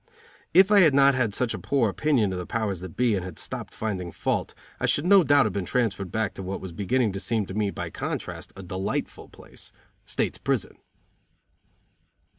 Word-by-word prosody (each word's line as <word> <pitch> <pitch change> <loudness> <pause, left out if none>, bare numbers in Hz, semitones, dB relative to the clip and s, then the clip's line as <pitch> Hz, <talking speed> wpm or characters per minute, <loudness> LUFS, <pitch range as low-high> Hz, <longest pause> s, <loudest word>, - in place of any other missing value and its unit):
If 190 +2 +6
I 205 - +7
had 155 -7 +5
not 140 0 +6
had 130 -5 +1
such 125 -3 0
a - - -5
poor 135 -5 +1
opinion 110 -3 +1
of 90 - -3
the 90 - -6
powers 105 -5 -2
that 90 -2 -9
be 125 -2 +3
and 95 -3 -1
had 90 -4 -8
stopped - - -5
finding 95 -5 -4
fault - - -2 0.2
I - - 0
should 145 - +2
no 195 0 +7
doubt 145 -2 +4
have 105 - -1
been 100 - -2
transferred 100 -3 -1
back 110 -3 -1
to - - -7
what 95 +1 -4
was 95 - -7
beginning 105 +5 0
to 95 - -5
seem 110 0 -1
to 95 - -8
me, 105 0 0
by - - -5
contrast, - - -5
a 95 - -9
delightful 95 +2 -4
place - - -12 0.4
state's - - -2
prison. - - -1
110 Hz, 205 wpm, -26 LUFS, 95-130 Hz, 0.4 s, I